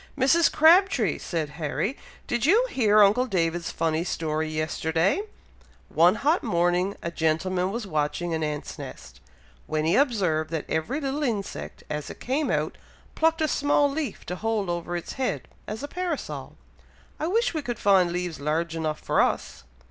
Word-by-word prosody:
"Mrs. 300 +6 +4
Crabtree!" 320 - +4
said 160 -3 -3
Harry, 195 - -1 0.3
"did 240 -2 -1
you 420 - +5
hear 215 -4 +5
uncle 215 +6 +3
David's 170 -4 0
funny 165 0 0
story 155 -3 -2
yesterday? 160 - 0 0.7
One - - +5
hot 305 +5 +2
morning 175 +3 +1
a 170 - -3
gentleman 180 +3 0
was 235 +1 -4
watching 160 0 -1
an 160 - -1
ant's 150 -1 -4
nest, - - -10 0.5
when 155 0 -1
he 165 - +3
observed, 185 - +2
that 160 -2 -3
every 190 - -1
little 280 0 -2
insect, 220 -8 -3
as 150 -1 -4
it - - -9
came 280 +4 -1
out, - - -1 0.3
plucked 325 0 +2
a 310 - +3
small 290 -1 +2
leaf, 300 -1 -4
to 180 - -4
hold 215 -4 -1
over 175 0 -3
its 170 - -6
head, 255 - -1 0.2
as 220 +5 -5
a - - -3
parasol! 350 0 -4 0.6
I 310 - -1
wish 455 +5 +1
we 315 - -2
could 240 -4 -4
find 190 -4 +4
leaves 175 -3 -3
large 160 +3 -1
enough 155 -1 -2
for - - +2
us." 65 - -1
190 Hz, 165 wpm, -26 LUFS, -, 0.7 s, you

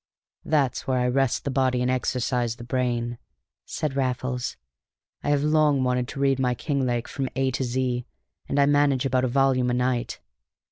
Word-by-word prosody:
"That's 140 -5 0
where 130 -1 +1
I 125 0 +1
rest 135 0 +1
the 140 - -2
body 130 -2 +1
and 125 +1 +1
exercise 125 -2 0
the 120 - -10
brain," 120 -1 -1 0.5
said 150 -3 -3
Raffles. 125 -2 -2 0.6
"I - - -2
have 145 -1 +2
long 150 -3 +3
wanted 125 -1 0
to 135 - -7
read 135 -1 +2
my 125 -2 +1
Kinglake 125 -3 -1
from 135 -2 -3
A 135 0 +1
to 130 - -2
Z, 125 0 -1 0.4
and 145 - +1
I 140 - +6
manage 145 -2 +3
about 130 -1 +2
a - - +1
volume 130 -1 +2
a 120 - +1
night. 125 -1 -1
130 Hz, 180 wpm, -25 LUFS, 125-135 Hz, 0.6 s, I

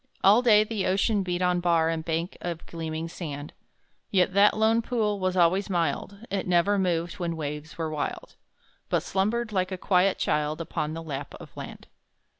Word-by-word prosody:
All 205 +5 +7
day 215 -4 +6
the 215 -3 -2
ocean 200 +2 +2
beat 180 -1 -2
on 180 0 +2
bar 170 -2 +2
And 165 -1 -2
bank 165 +2 -2
of 170 -1 -5
gleaming 160 -1 -4
sand; 150 -4 -7 0.6
Yet 185 -1 +2
that 205 +2 +5
lone 220 +1 +3
pool 215 -4 -1
was 185 0 -1
always 185 +4 +3
mild, 180 +5 -2
It 195 -2 -2
never 180 +3 +3
moved 175 -1 -1
when 170 -2 -2
waves 150 +1 -5
were 160 -2 -2
wild, 150 -2 -4 0.5
But - - +1
slumbered, 215 +4 -1
like 185 -2 0
a 185 - -3
quiet 185 +1 +2
child, 150 +1 0
Upon 155 -1 -3
the 165 - -6
lap 145 -3 -6
of - - -13
land. - - -8
180 Hz, 180 wpm, -27 LUFS, 165-200 Hz, 0.6 s, All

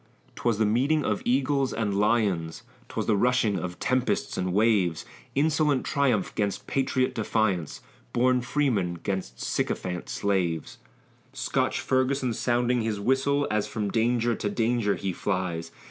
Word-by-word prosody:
'Twas 115 -3 0
the 110 - +2
meeting 135 +8 +2
of 105 - 0
eagles 135 +1 +1
and 105 -3 -1
lions; 100 -6 +1 0.3
'Twas - - -3
the 110 - +2
rushing 115 -2 +2
of 90 -1 -5
tempests 130 0 0
and 90 0 -1
waves; 100 -5 +2 0.3
Insolent 150 -1 +2
triumph 125 -9 +1
'gainst 100 -2 -2
patriot 130 -1 0
defiance, 105 -7 -1 0.3
Born 125 +1 +2
freemen 120 -10 0
'gainst 90 -8 -4
sycophant 90 -1 -2
slaves; 90 -6 -1 0.5
Scotch - - 0
Ferguson 130 -1 +1
sounding 120 +1 +1
his 110 -2 -2
whistle, 135 +5 +1
As 105 -1 0
from 105 -2 -3
danger 120 +1 +2
to 105 - -2
danger 115 -1 +1
he 95 -2 -3
flies. 90 -4 -2
110 Hz, 135 wpm, -27 LUFS, 100-130 Hz, 0.5 s, the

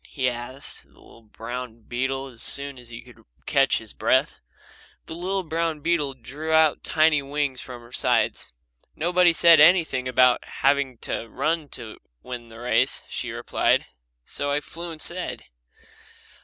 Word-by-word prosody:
he 130 -3 -1
asked 125 +3 -5
the - - -25
little 115 - -17
brown 115 +2 -7
beetle 130 +4 -2
as 125 -4 -11
soon 140 -1 -1
as 120 -1 -12
he 115 -1 -9
could 125 -1 -17 0.2
catch - - +3
his - - -5
breath. - - +1 0.7
The - - -7
little 185 +3 -2
brown 165 -2 -2
beetle 150 -4 0
drew 145 +6 -6
out 160 -1 +4
the - - -7
tiny 155 -2 +4
wings 140 -2 -2
from 125 -2 -9
her 120 - -16
sides. - - 0 0.4
"Nobody 175 +2 +4
said 165 -1 +6
anything 155 -6 +5
about 125 -1 +4
having 140 -2 0
to 115 - -3
run 155 +2 -1
to 115 -3 -10 0.2
win 120 -2 -7
the 115 - -12
race," 120 +1 +1
she - - -4
replied, - - +1 0.4
"so 145 - -4
I 145 +1 +1
flew 170 +4 -8
instead." 170 +3 -5
140 Hz, 155 wpm, -24 LUFS, 125-160 Hz, 0.7 s, said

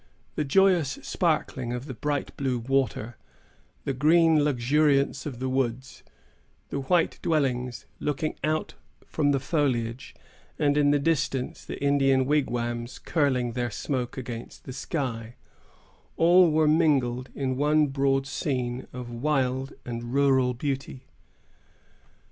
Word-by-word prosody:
The 150 - -1
joyous 170 -1 +3
sparkling 135 -7 -1
of 125 +2 -5
the 135 - -6
bright 145 +4 -3
blue 130 -3 -1
water; 120 -2 -1 0.7
the 140 - -2
green 160 +3 +4
luxuriance 140 +1 +2
of 130 -5 -6
the 130 +2 -3
woods; 130 0 -2 0.7
the 140 - -3
white 165 +5 +1
dwellings, 125 -6 -1
looking 150 +1 -2
out 155 +1 -1 0.3
from 145 -2 0
the 140 -1 +2
foliage; 130 -5 -1 0.4
and, 145 -1 +2
in 145 -1 +4
the 145 - +4
distance, 140 -3 -1
the - - -7
Indian 135 -2 +3
wigwams 120 -4 -1
curling 130 -6 0
their 120 0 -2
smoke 125 +2 -3
against 120 -2 -7
the 130 - -8
sky,——all 140 +6 -1
were 155 0 +3
mingled 135 -6 +2
in 130 -2 -1
one 150 +2 +3
broad 135 -1 +1
scene 130 -3 -3
of 125 -1 -7
wild 130 0 -1
and 120 +1 -5
rural 130 -3 +3
beauty. 135 0 -4
135 Hz, 125 wpm, -26 LUFS, 125-150 Hz, 0.7 s, green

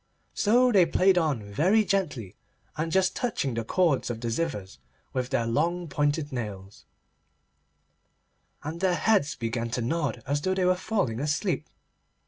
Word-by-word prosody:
So 245 +4 +3
they 190 -6 +5
played 185 +2 +4
on 150 -10 0
very 180 - +2
gently 145 - -2 0.4
and 160 +1 -2
just 190 +1 +2
touching 180 - -1
the 115 0 -2
cords 160 +1 +1
of 115 -2 -4
the 115 0 -3
zithers 115 - -3 0.3
with 130 -1 -2
their 115 - 0
long 170 +9 0
pointed 145 0 -1
nails, 105 -5 -6 1.8
and 155 +3 -5
their 185 -2 +2
heads 200 -8 +2
began 115 0 -3
to 120 +1 -2
nod 135 -3 -2
as 145 +1 -1
though 185 +4 0
they 185 -1 +1
were 180 - +5
falling 185 - -1
asleep. 150 +2 -1
150 Hz, 150 wpm, -27 LUFS, 115-185 Hz, 1.8 s, they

